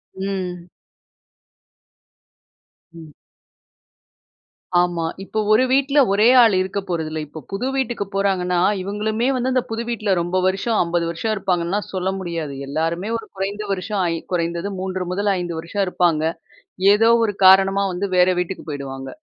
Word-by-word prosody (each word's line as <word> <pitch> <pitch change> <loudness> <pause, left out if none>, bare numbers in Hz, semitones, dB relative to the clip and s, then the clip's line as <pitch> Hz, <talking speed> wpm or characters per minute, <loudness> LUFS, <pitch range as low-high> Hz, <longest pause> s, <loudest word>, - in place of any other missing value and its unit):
ம். 185 -2 -4 2.3
ம். 160 -2 -12 1.7
ஆமா. 175 -2 0 0.2
இப்போ 215 +2 -3
ஒரு 220 +4 +5
வீட்டில 275 +2 +3
ஒரே 210 +3 +4 0.2
ஆள் 220 -4 +4
இருக்க 190 +2 -2
போறதில்ல. 160 -3 -3
இப்போ 155 +2 -9
புது 220 +7 -2
வீட்டுக்கு 240 -6 -1
போறாங்கன்னா, 185 -2 +1 0.2
இவங்களுமே 215 +5 -1
வந்து 255 +1 -1
அந்த 255 - +3
புது 225 +1 -3
வீட்டில 215 -4 -1
ரொம்ப 175 +2 -1
வருஷம் 195 +4 0
50 170 0 -1
வருஷம் 215 +6 -2
இருப்பாங்கன்னுலாம் 190 0 -1
சொல்ல 185 0 -1
முடியாது. 165 -5 -4
எல்லாருமே 165 +7 -2
ஒரு 225 - -9
குறைந்த 200 +2 -3
வருஷம் 195 +1 -2
ஐ - - -1 0.2
குறைந்தது 170 +2 -1
3 185 -1 -3
முதல் 205 +2 0
5 175 -2 -4
வருஷம் 195 +5 -2
இருப்பாங்க. 175 -4 +1 0.7
ஏதோ 225 +2 +4 0.2
ஒரு 210 - 0
காரணமா 195 +1 +6
வந்து 195 +3 -2
வேற 180 0 +5
வீட்டுக்கு 180 +2 -4
போயிடுவாங்க. 135 -2 -6
190 Hz, 135 wpm, -21 LUFS, 170-210 Hz, 2.3 s, காரணமா